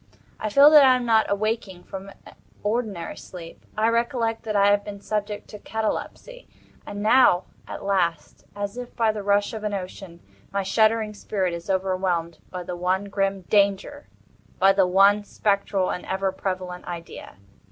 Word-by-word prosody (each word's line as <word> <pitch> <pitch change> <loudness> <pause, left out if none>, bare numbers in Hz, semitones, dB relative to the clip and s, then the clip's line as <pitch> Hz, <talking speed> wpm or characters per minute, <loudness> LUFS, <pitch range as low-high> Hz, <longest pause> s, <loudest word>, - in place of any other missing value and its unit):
I 215 - -2
feel 280 +7 +7
that 300 -2 +9
I 260 -1 +6
am 250 -1 -2
not 225 -2 +3
awaking 200 -3 -2
from 195 0 -8 0.5
ordinary 210 -5 -2
sleep. 170 -3 -11
I 220 +1 +3
recollect 230 -1 0
that 215 -1 -3
I 200 0 +5
have 205 0 +2
been 205 -1 -8
subject 210 0 -4
to 210 - -9
catalepsy. 225 - -4 0.4
And 205 0 -5
now, 215 -5 +5 0.2
at - - -7
last, 180 -4 -1
as 205 +2 -4
if 245 -1 -9
by 225 -2 +2
the 215 -1 -5
rush 205 +1 +1
of 220 -1 -6
an 210 -1 -1
ocean, 185 -2 -8 0.3
my 200 0 -1
shuddering 215 +2 +2
spirit 195 -3 -2
is 170 +2 -7
overwhelmed 185 -3 -1
by 180 -1 -6
the 175 - -5
one 185 +3 -1
grim 195 -1 -1
Danger—by 200 - 0
the 195 -2 +3
one 200 +3 +4
spectral 200 -2 0
and 180 - -4
ever 190 0 -1
prevalent 185 -1 -5
idea. 170 -1 -8
200 Hz, 165 wpm, -24 LUFS, 185-215 Hz, 0.5 s, that